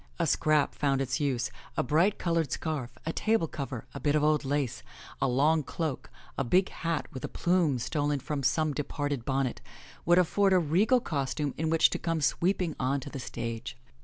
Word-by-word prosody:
A - - +1
scrap 155 -2 +2
found 140 -2 +1
its 130 -1 -1
use. 130 -5 0 0.3
A - - +2
bright 165 +10 +2
colored 165 -5 0
scarf, 140 -7 -3
a 160 - -2
table 220 -6 +1
cover, 135 -5 -5
a - - -6
bit 145 0 +1
of 150 - +2
old 150 -1 +3
lace, 140 -3 -1 0.4
a - - +3
long 145 +5 +3
cloak, 150 0 -4 0.3
a - - +2
big 180 +10 +3
hat 165 -2 -2
with 130 - -7
a - - -1
plume 170 -6 +1
stolen 145 +4 -1
from 140 +2 -3
some 155 +3 +1
departed 145 -3 -3
bonnet, 135 -2 -1 0.4
would 175 +1 +4
afford 190 +2 +3
a - - +6
regal 190 - +3
costume 145 - -2
in 160 +1 -1
which 165 0 +4
to - - -2
come 165 -1 -1
sweeping 170 +3 +1
on 135 +2 +1
to 135 +1 -8
the 140 - -5
stage. 115 - -5
150 Hz, 190 wpm, -29 LUFS, 135-165 Hz, 0.4 s, a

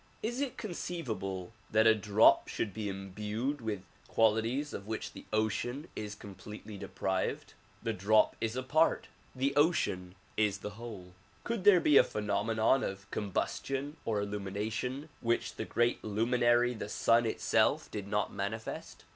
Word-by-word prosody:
Is 240 +5 -1
it 275 -3 -2
conceivable 110 - -4 0.2
that 110 0 +4
a 110 - +8
drop 105 0 +5
should 105 - -3
be 110 -2 -3
imbued 105 +8 -3
with 105 -4 -3 0.2
qualities 115 +6 +2
of 100 - -6
which 110 0 -4
the - - -10
ocean 110 +7 -1
is 105 -1 -5
completely 105 +2 -9
deprived? 95 -1 -2 0.3
The 115 - 0
drop 105 +2 +3
is 115 +1 -1
a 130 - -2
part, 155 +5 +2 0.3
the 135 +2 0
ocean 140 - +2 0.2
is 105 -2 +2
the 105 - -3
whole. 105 -5 -9 0.3
Could 230 -5 -3
there 200 -3 +8
be 150 -4 +5
a - - +9
phenomenon 110 +4 +1
of 95 +1 -5
combustion 135 +8 -2
or 110 -2 0
illumination 105 +8 -3
which 115 -1 0
the 110 - -4
great 120 +2 +1
luminary 120 +3 +3
the 110 -3 -6
sun 115 +2 +3
itself - - +2
did 100 -2 -5
not 105 0 0
manifest 110 +3 -5
110 Hz, 145 wpm, -32 LUFS, 105-125 Hz, 0.3 s, a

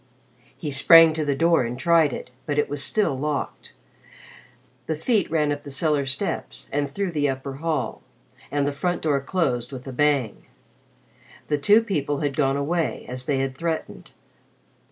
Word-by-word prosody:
He 150 - -5
sprang 165 +4 +7
to 155 0 -2
the 145 -2 0
door 165 -1 +3
and 120 +1 -4
tried 165 -1 +3
it, 125 - -7 0.2
but 145 -1 -1
it 150 - +2
was 145 -1 -3
still 205 -7 0
locked. 145 +1 -4 1.1
The 160 - -1
feet 205 +5 0
ran 150 -2 +1
up 145 0 -3
the 145 - -10
cellar 140 0 +2
steps 65 - -3
and 145 0 0
through 200 -2 -3
the 145 -3 0
upper 135 0 -5
hall, 155 -2 -2 0.5
and 145 -1 0
the 145 - 0
front 175 +5 -2
door 145 -3 +1
closed 135 -6 -1
with 130 -2 -8
a 135 - -7
bang. 140 -5 0 1.0
The 150 -1 +1
two 210 +10 +5
people 145 -9 -2
had 145 -2 -1
gone 135 -2 +1
away, 160 +2 -1
as 125 0 -6
they 140 - +1
had 135 0 -2
threatened. 165 +2 -4
145 Hz, 175 wpm, -24 LUFS, 135-160 Hz, 1.1 s, sprang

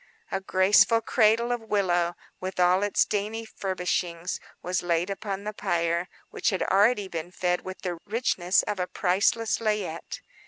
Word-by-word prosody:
A 195 - -1
graceful 190 +4 +4
cradle 230 +1 +3
of 240 -1 -1
willow, 175 -5 +1 0.2
with 185 0 -5
all 180 +1 +4
its 205 0 +2
dainty 215 +2 -2
furbishings, 180 -4 -2 0.2
was 180 +1 -1
laid 175 +2 0
upon 195 0 -4
the 210 +1 -4
pyre, 170 -3 0 0.2
which - - 0
had 190 -4 -1
already 205 +1 +3
been 170 -1 -5
fed 180 0 -1
with 185 0 -8
the 175 -3 -3
richness 200 -5 +1
of 210 -2 -3
a 180 - -1
priceless 205 +5 +1
layette. 210 -7 -2
190 Hz, 155 wpm, -26 LUFS, 180-210 Hz, 0.2 s, graceful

